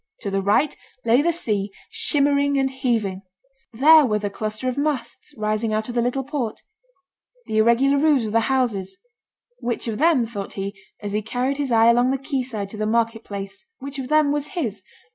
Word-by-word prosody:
To 200 - -3
the 195 0 0
right 210 +9 +2 0.3
lay 235 +4 +4
the 340 +3 +2
sea, 210 - -1 0.2
shimmering 285 -1 +2
and 270 -1 +1
heaving; 230 -8 -1 0.5
there 300 +7 +7
were 215 -5 +1
the 205 -1 -3
cluster 215 +4 -4
of 255 - -1
masts 280 -5 -3
rising 215 +1 -1
out 215 +2 -1
of - - -4
the 240 - +1
little 250 +3 -1
port; 260 -5 -4 0.8
the 220 - -2
irregular 250 +5 +4
roofs 290 -5 +3
of 215 - -3
the 230 - +3
houses; 205 -8 0 0.6
which 240 0 -3
of 220 0 -3
them, 310 -6 +4
thought 205 -4 -6
he, 195 +1 -4 0.3
as 205 -1 -4
he 210 - 0
carried 250 +5 -2
his 280 -3 -2
eye 225 -1 +5
along 245 +2 +3
the 270 - +1
quay 270 0 -2
side 220 -6 -5
to 215 - -9
the 215 0 -1
market 230 0 0
place, 200 - -7
which 275 +1 -7
of 260 - -4
them 305 0 +3
was 295 +5 -3
his? 215 - -2
240 Hz, 200 wpm, -22 LUFS, 215-275 Hz, 0.8 s, there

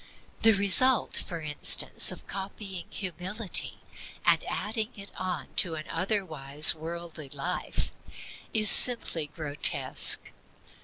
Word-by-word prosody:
The 225 0 +4
result, 205 +6 +1
for 170 -2 -6
instance, 150 -1 0
of - - -11
copying 195 -2 -7
Humility, 185 +3 -2 0.5
and - - +2
adding 220 +1 -4
it 200 -1 -10
on 185 -1 -6
to 165 -3 +2
an 155 0 -9
otherwise 160 -6 +3
worldly 165 -2 -10
life, 155 +6 -5 0.6
is 215 -1 +2
simply 200 -10 +4
grotesque. 150 -1 +2
180 Hz, 105 wpm, -26 LUFS, 155-205 Hz, 0.6 s, The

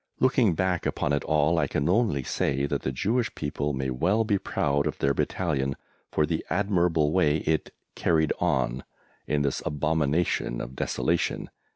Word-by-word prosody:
Looking 125 -8 +3
back 90 0 0
upon 75 - -1
it 70 - 0
all 80 +2 +2
I - - +1
can 70 - -1
only 95 - +2
say 70 +2 0
that 70 - -2
the 65 - -2
Jewish 110 - -1
people 75 0 -2
may 65 -1 -2
well 95 - +2
be 105 -3 +1
proud 70 -4 0
of - - -3
their 70 0 +1
Battalion 70 -5 -1 0.4
for 75 - +2
the 80 0 -2
admirable 85 -6 +2
way 80 -4 +3
it 80 -1 0 0.2
"carried 80 -2 +2
on" 65 -7 0 0.4
in 75 -1 +1
this 70 - -1
abomination 75 -3 0
of 65 - -6
desolation. - - -1
75 Hz, 165 wpm, -26 LUFS, 70-90 Hz, 0.4 s, Looking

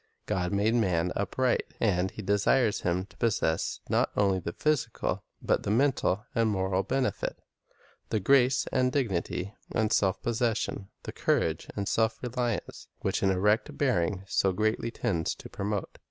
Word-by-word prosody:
God 90 -1 -1
made 105 +3 +2
man 90 -6 +1
upright, 125 +5 0
and 95 -3 +2
He 110 - -8
desires 105 +3 +2
him 90 +1 0
to - - -22
possess 90 -8 0
not - - +2
only 100 -2 +3
the 85 - -4
physical 150 - -1 0.2
but - - +2
the - - -4
mental 115 -4 +2
and 115 -1 +2
moral 95 -2 +1
benefit, 130 +5 -1 0.7
the 110 - +1
grace 130 +4 +4
and 130 0 +2
dignity 100 -6 -1 0.2
and 110 -1 +2
self 95 -2 +2
possession, 115 -4 -1
the - - -5
courage - - 0
and 100 -1 -2
self 110 0 +1
reliance, 120 -2 -3
which - - -1
an 95 - +3
erect 105 +4 +1
bearing 100 -8 +1
so 95 +2 +2
greatly 110 +4 0
tends 95 -9 -1
to - - -10
promote. 100 0 -3
105 Hz, 155 wpm, -29 LUFS, 95-120 Hz, 0.7 s, grace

